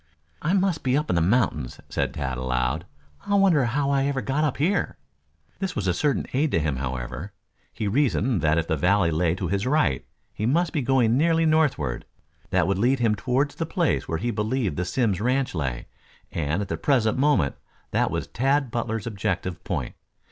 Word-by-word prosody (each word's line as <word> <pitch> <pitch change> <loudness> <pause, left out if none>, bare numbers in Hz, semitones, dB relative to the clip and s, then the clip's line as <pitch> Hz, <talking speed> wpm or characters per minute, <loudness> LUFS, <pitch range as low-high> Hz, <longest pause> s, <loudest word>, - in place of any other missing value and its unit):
"I 165 +4 0
must 190 -4 +1
be 130 +1 +2
up 150 +1 -1
in - - +1
the 85 - +3
mountains," 90 - +1
said - - -2
Tad 65 -1 -2
aloud. 65 +6 -1 0.4
"I 200 - +2
wonder 185 -9 +4
how 140 +4 0
I 135 -1 +2
ever 140 -1 -1
got 135 +3 -1
up 150 -4 0
here." 180 +5 0 0.6
This 190 -2 -3
was 105 - -2
a 90 - +2
certain 145 - 0
aid 145 +4 +2
to - - +3
him, 75 -4 -1
however. 65 +7 -5 0.4
He 110 - -3
reasoned 120 - +1
that 75 0 +2
if 80 - +1
the 80 - +1
valley 90 +3 +2
lay 80 +1 +1
to 95 -1 -3
his 100 +5 -1
right, 130 - +2 0.3
he 105 - -2
must 165 +5 +1
be 150 - 0
going 125 -2 +3
nearly 165 +1 +3
northward. 150 - +1 0.4
That 90 -2 +2
would 95 +1 0
lead 125 +5 +3
him 115 -3 +2
toward 130 +7 0
the 165 - -4
place 170 -2 0
where 80 - -1
he 120 +8 -1
believed 110 - -1
the 90 - -2
Simms 105 -2 0
ranch 130 +3 +1
lay, 65 -7 -3 0.5
and 80 +5 -1
at - - -7
the 80 - -3
present 110 - +2
moment 130 - +3 0.4
that - - +2
was - - -2
Tad 135 +1 0
Butler's 115 -2 -2
objective 95 -5 -3
point. 70 -9 -3
110 Hz, 200 wpm, -25 LUFS, 85-140 Hz, 0.6 s, wonder